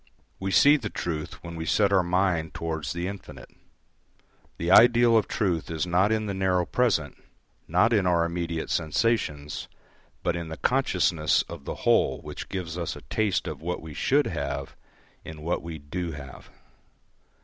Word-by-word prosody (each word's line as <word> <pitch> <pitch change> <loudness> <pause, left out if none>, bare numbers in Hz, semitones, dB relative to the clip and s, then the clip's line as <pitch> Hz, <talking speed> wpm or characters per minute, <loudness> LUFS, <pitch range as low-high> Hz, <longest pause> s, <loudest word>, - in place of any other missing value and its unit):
We 95 - -2
see 145 +10 +6
the 115 -7 -5
truth 80 -5 -5
when 85 0 -7
we 80 0 -5
set 100 +5 +3
our 95 - +5
mind 90 -2 0
towards 80 -4 -3
the 85 +1 -3
infinite. 100 -1 -9 1.1
The 85 +2 -1
ideal 120 0 +7
of 110 -3 +3
truth 90 -7 -1
is 80 0 -2
not 90 +4 +2
in 110 -1 0
the 100 - -3
narrow 95 -2 +1
present, 100 -13 0 0.4
not 90 +8 +3
in 100 -4 +3
our 85 -2 +3
immediate 85 -1 -3
sensations, 80 -4 -1 0.6
but 85 - 0
in 85 -1 -4
the 80 0 -7
consciousness 90 - +2
of 85 -5 -10
the - - -4
whole - - +3
which - - -8
give 90 -4 -4
us 85 - -3
a - - -10
taste 105 -4 -1
of - - -6
what 90 +2 -3
we 80 -1 -9
should 145 - +2
have 70 -1 -4 0.5
in 75 -1 -9
what 85 - -1
we 85 -1 -6
do 80 +3 -5
have. 65 -4 -10
85 Hz, 170 wpm, -26 LUFS, 80-100 Hz, 1.1 s, ideal